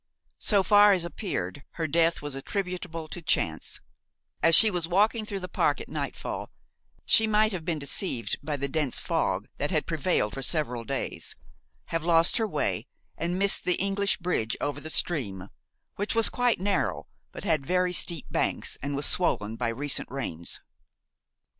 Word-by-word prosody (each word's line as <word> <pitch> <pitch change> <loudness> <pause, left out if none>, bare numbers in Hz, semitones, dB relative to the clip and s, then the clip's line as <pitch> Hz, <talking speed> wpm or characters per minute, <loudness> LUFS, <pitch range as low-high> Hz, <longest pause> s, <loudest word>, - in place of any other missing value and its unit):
So 200 -3 +3
far 205 0 +6
as 180 -3 -1
appeared, 145 - -4
her 165 - -3
death 165 +1 +1
was 145 -1 -5
attributable 175 +1 -4
to 175 - -8
chance; 160 - -1 0.6
as 165 +1 +7
she 220 -1 +10
was 175 -3 -2
walking 215 +5 +2
through 200 -2 -5
the 185 - -5
park - - 0
at - - -8
nightfall, - - -5 0.6
she 220 - +5
might 215 0 +3
have 180 -5 -4
been 165 -1 -2
deceived 140 - -2
by 150 -2 -3
the 140 0 -2
dense 145 -2 -1
fog - - -1
that - - -1
had - - 0
prevailed 105 - 0
for 135 - -5
several 125 -5 -1
days, - - -4 0.6
have 165 -1 0
lost 165 +4 +3
her 225 -2 0
way - - -2 0.3
and 175 +2 -2
missed 200 +1 +1
the 180 - +2
English 200 +1 0
bridge 170 -11 -2
over 145 0 -3
the 160 - -6
stream, 100 - +1 0.5
which 205 +3 -2
was 225 -1 +4
quite 245 -4 +1
narrow 195 +1 -1 0.3
but - - -9
had 160 -7 +1
very 180 +4 +1
steep 170 -4 +2
banks - - -1
and 140 +1 -3
was 145 - -1
swollen 110 - 0
by 120 +1 -2
recent 135 +5 +1
rains. 85 -11 -4
170 Hz, 170 wpm, -27 LUFS, 140-195 Hz, 0.6 s, she